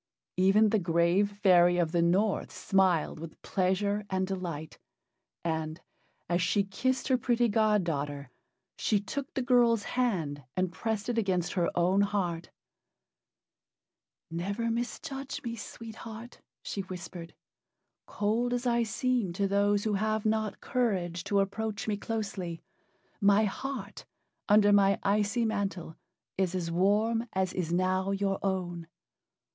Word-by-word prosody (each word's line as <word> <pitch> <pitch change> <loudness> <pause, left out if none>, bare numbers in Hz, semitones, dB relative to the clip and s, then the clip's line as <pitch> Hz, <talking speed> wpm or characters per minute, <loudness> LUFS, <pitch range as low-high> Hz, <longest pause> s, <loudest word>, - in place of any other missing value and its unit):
Even 195 +4 +5
the 215 - +2
grave 170 +3 +2
fairy 175 -2 +6
of 170 -3 +1
the 170 -1 +2
North 190 +5 +1
smiled 185 -5 +1
with 165 0 -9
pleasure 200 +2 0
and 190 0 0
delight, 175 -5 -5 0.7
and, 160 -1 -2 0.5
as 175 +1 +1
she 200 +3 +2
kissed 260 +7 -1
her 260 -2 +3
pretty 240 0 +2
god 215 -2 +3
daughter, 145 -4 -3 0.5
she 210 - +2
took 265 +7 -5
the 265 - 0
girl's 235 -3 +4
hand 170 - -1
and 185 -1 +1
pressed 220 +2 -3
it 240 -1 +1
against 185 -5 0
her 175 -3 +1
own 185 +3 +3
heart. 180 -5 -1 1.8
"Never 200 +7 -2
misjudge 270 +3 -4
me, 230 -1 -4
Sweet 225 0 -9
Heart," 225 +2 -9 0.2
she 200 - -3
whispered. 175 -2 -8 0.7
"Cold 230 +4 0
as 245 +1 -3
I 235 -1 +2
seem 235 -4 0
to 195 +2 0
those 200 +1 +2
who 215 - 0
have 215 +2 0
not 215 -1 0
courage 185 -9 -1
to 200 -1 +2
approach 205 +2 -3
me 210 - +1
closely, 200 -6 -4 0.6
my 205 0 +5
heart, 270 +7 -5 0.4
under 205 0 +6
my 200 -1 +5
icy 210 +4 +1
mantle, 195 -6 -2 0.4
is 185 -1 +1
as 170 -2 -2
warm 215 +6 +2
as 190 -1 0
is 170 -3 -2
now 185 +2 +1
your 195 0 0
own." 175 -3 -2
200 Hz, 135 wpm, -29 LUFS, 175-220 Hz, 1.8 s, fairy